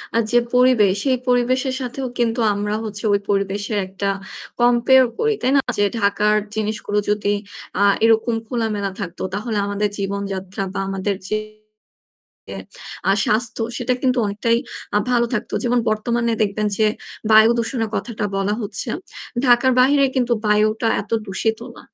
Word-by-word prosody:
আ - - +3
যে 240 - +4 0.2
পরিবেশ 250 -6 +4
সেই 260 -2 +2
পরিবেশের 255 +2 +1
সাথেও 260 +2 -4
কিন্তু 235 0 0
আমরা 205 +1 -2
হচ্ছে 210 -1 -5
ওই 200 - +3
পরিবেশের 200 +1 -1
একটা 195 +1 -4 0.5
কম্পেয়ার 245 +2 +5
করি, 450 -1 +1
তাই 255 - +1
না? - - +6 0.2
যে 205 - +3 0.2
ঢাকার 210 +1 +2 0.2
জিনিসগুলো 210 -1 -2
যদি 210 -1 0 0.5
আ - - +5 0.2
এরকম 225 +1 +3
খোলামেলা 215 -5 -2
থাকতো 175 +1 -6
তাহলে 215 +1 -2
আমাদের 205 +1 -1
জীবনযাত্রা 195 -1 -4
বা 195 - -3
আমাদের 195 +1 -2
যে 215 - +1 1.7
আ - - +5
স্বাস্থ্য 230 +2 +1
সেটা 250 0 0
কিন্তু 255 -1 +2
অনেকটাই 220 +3 +1 0.4
আ - - +6
ভালো 240 -1 +3
থাকতো। 225 +1 -3
যেমন 245 0 +2
বর্তমানে 235 +2 0
দেখবেন 210 +1 0
যে 220 - +3 0.4
বায়ুদূষণের 225 +1 +4
কথাটা 225 -3 -4
বলা 195 +1 0
হচ্ছে। 210 +4 -4 0.6
ঢাকার 245 +1 +5
বাহিরে 275 +2 +4
কিন্তু 245 -1 +1
বায়ুটা 215 +2 +2
এত 200 - -11 0.2
দূষিত 220 +3 -1 0.2
না। - - -12
220 Hz, 145 wpm, -20 LUFS, 205-240 Hz, 1.7 s, না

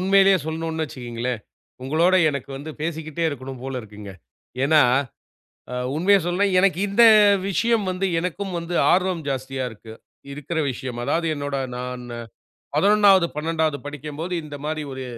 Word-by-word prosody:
உண்மையிலயே 195 0 +5
சொல்லனுன்னு 160 0 -3
வச்சுக்கோங்களேன், 120 -3 -5 0.4
உங்களோட 160 +7 +2 0.2
எனக்கு 140 -1 -6
வந்து 145 +3 -7
பேசிக்கிட்டே 160 0 -4
இருக்கனும் 135 -3 -7
போல 135 0 -4
இருக்குங்க. 105 -2 -10 0.5
ஏன்னா 150 +1 +5 0.9
அ - - -3 0.2
உண்மைய 195 +6 +4
சொல்லனுன்னா 185 +3 +1
எனக்கு 185 -1 +3
இந்த 200 +4 +4 0.5
விஷயம் 225 +4 +1
வந்து, 185 +1 -1
எனக்கும் 185 +3 -3
வந்து 170 +1 -5 0.2
ஆர்வம் 180 -2 +1
ஜாஸ்தியா 135 -1 -3
இருக்கு 110 0 -12 0.4
இருக்ற 150 +4 -4
விஷயம். 125 -1 -6
அதாவது 165 +6 0
என்னோட 145 -1 -3 0.2
நான் 125 0 -5 0.7
11வது, 200 -3 +5
12வது 160 -1 0
படிக்கம்போது 150 +4 -5
இந்த 145 -1 -8
மாரி 155 0 -2
ஒரு 130 0 -6
155 Hz, 135 wpm, -23 LUFS, 135-180 Hz, 0.9 s, உண்மையிலயே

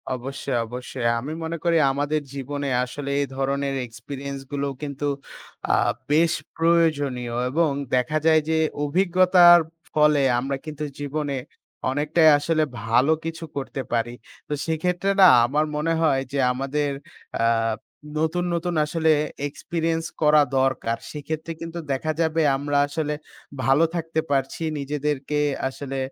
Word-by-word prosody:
অবশ্যই, 135 +1 -4
অবশ্যই। 125 +1 -6
আমি 140 +6 -5
মনে 165 +1 -3
করি 170 -1 +3
আমাদের 145 +2 -1
জীবনে 140 +1 -4
আসলে 140 +3 -6
এই 140 - 0
ধরনের 135 +1 -1
এক্সপেরিয়েন্স 135 +4 -7
গুলো 140 0 -1
কিন্তু 145 0 -3 0.7
আ - - +5 0.4
বেশ 160 +2 +4 0.2
প্রয়োজনীয় 145 -8 +1
এবং 160 +4 +2 0.3
দেখা 125 +5 +1
যায় 160 -1 +5
যে 160 - +2 0.3
অভিজ্ঞতার 180 +2 +6 0.3
ফলে 150 -1 +4 0.2
আমরা 135 +2 -2
কিন্তু 155 -1 -6 0.2
জীবনে 145 -1 -2 0.5
অনেকটাই 150 +3 +4
আসলে 155 +1 +1 0.2
ভালো 120 +6 +3
কিছু 165 0 -5
করতে 135 -1 -4
পারি। 120 0 0 0.3
তো - - -3
সেক্ষেত্রে 175 +4 -1
না 185 - +10 0.2
আমার 150 +5 +1
মনে 160 +2 0
হয় 140 -5 +3
যে 140 - -1
আমাদের 140 +3 -1 0.5
আ - - +4 0.7
নতুন, 165 +3 0
নতুন 170 +1 -2
আসলে 160 +1 +1 0.4
এক্সপেরিয়েন্স 165 +3 -2 0.2
করা 150 0 +6 0.2
দরকার। 130 -3 0
সেক্ষেত্রে 155 +2 -5
কিন্তু 165 +1 -5
দেখা 135 +4 -1
যাবে 160 0 +1 0.2
আমরা 145 +1 -1
আসলে 150 0 -2 0.5
ভালো 135 +4 +4
থাকতে 165 -1 -2
পারছি 135 +3 -1 0.2
নিজেদেরকে 145 0 -2 0.3
আসলে, 135 0 -6
150 Hz, 130 wpm, -24 LUFS, 135-160 Hz, 0.7 s, না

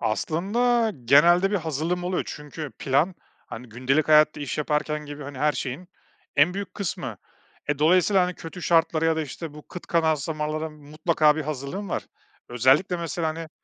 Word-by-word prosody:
Aslında, 220 - +1
genelde 175 +9 +5
bir 205 - +1
hazırlığım 165 +2 -2
oluyor 180 0 -1
çünkü 150 0 -7
plan, 145 +7 +1 0.3
hani, 125 +1 -9
gündelik 130 +7 0
hayatta 155 -1 +5
iş 145 0 -4
yaparken 150 0 -1
gibi, 145 0 -8
hani, 140 -1 -8
her 150 +2 +2
şeyin 145 +8 -5 0.5
en 160 +6 +4
büyük 200 0 -5
kısmı. 200 -5 -4 0.5
E, 145 - 0
dolayısıyla, 180 +5 +4
hani, 180 - -3
kötü 165 +2 -9
şartlara 165 -1 +2
ya 165 0 +2
da, 160 - 0
işte, 150 +1 -7
bu 150 - -12
kıt 180 - -9
kanaat 160 -3 +1
zamanlara 155 0 -3
mutlaka 155 +1 +1
bir 155 - -2
hazırlığım 150 +7 -5
var. - - -3 0.4
Özellikle 130 +10 +3
mesela, 170 0 -2
hani, 160 0 -5
155 Hz, 165 wpm, -25 LUFS, 150-175 Hz, 0.5 s, genelde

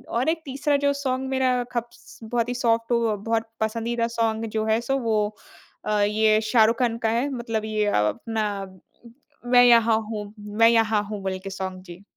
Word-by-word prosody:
और 255 +6 +1
एक 325 0 -1
तीसरा 280 +2 0
जो 285 0 +1
सॉन्ग 265 -1 -2
मेरा 255 -2 +1
खप्स 240 0 -7
बहुत 235 +1 -1
ही - - -1
सॉफ़्ट 230 -1 0
हो 235 0 +3
अ, 215 - 0
बहुत 225 +2 -2
पसंदीदा 230 +1 -1
सॉन्ग 225 0 0
जो 215 - 0
है 220 +1 +2
सो 270 +3 -1
वो 225 -3 0 0.7
अ, 210 -1 +1
ये 215 +1 +3
शाहरुख 225 +1 +3
खान 235 -2 +1
का - - +3
है 240 +5 0
मतलब 230 -4 -3
ये 215 -1 -1
अ, 205 - +1
अपना 210 - -3 0.9
मैं 245 0 +7
यहाँ 230 -2 +5
हूँ 210 -1 -6 0.2
मैं 230 0 +7
यहाँ 225 -2 +2
हूँ, 205 -1 -6
बोल 190 -1 -3
के 195 - -5
सॉन्ग। 190 -1 -5
जी। 180 +1 -12
225 Hz, 190 wpm, -24 LUFS, 215-240 Hz, 0.9 s, मैं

